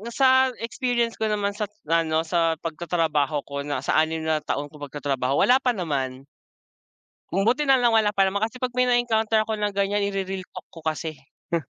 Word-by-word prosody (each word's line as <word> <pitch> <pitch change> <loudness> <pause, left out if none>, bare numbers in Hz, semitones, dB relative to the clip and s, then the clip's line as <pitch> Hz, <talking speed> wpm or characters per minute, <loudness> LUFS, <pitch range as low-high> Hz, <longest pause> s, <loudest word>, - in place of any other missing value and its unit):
sa 260 -1 +5 0.2
experience 240 -1 -1
ko 220 - +1
naman 205 -1 0
sa't 210 0 -4 0.2
ano 160 -1 +2
sa 165 -1 +1
pagtatrabaho 160 -3 0
ko 140 0 -6
na 140 -2 -2
sa 155 - +2
6 160 0 0
na 160 -1 +1
taon 145 0 -4
kong 145 -2 -8
pagtatrabaho 135 -1 0
wala 255 +2 +5
pa 250 -3 0
naman. 135 -7 -3 1.1
Buti 230 +10 +2
na 265 - +7
lang 240 -2 +3
wala 215 -2 +4
pa 195 -2 +2
naman 200 +2 -1
kasi 225 +3 -2
pag 250 -1 -3
may 250 0 +2
na-encounter 225 -2 +2
ako 220 - -2
na 210 -1 0
ganyan 200 +1 0
i-re-realtalk 195 -2 -4
ko 165 - -11
kasi, 155 0 -3 0.4
hmm. 165 - +2
195 Hz, 185 wpm, -24 LUFS, 155-225 Hz, 1.1 s, na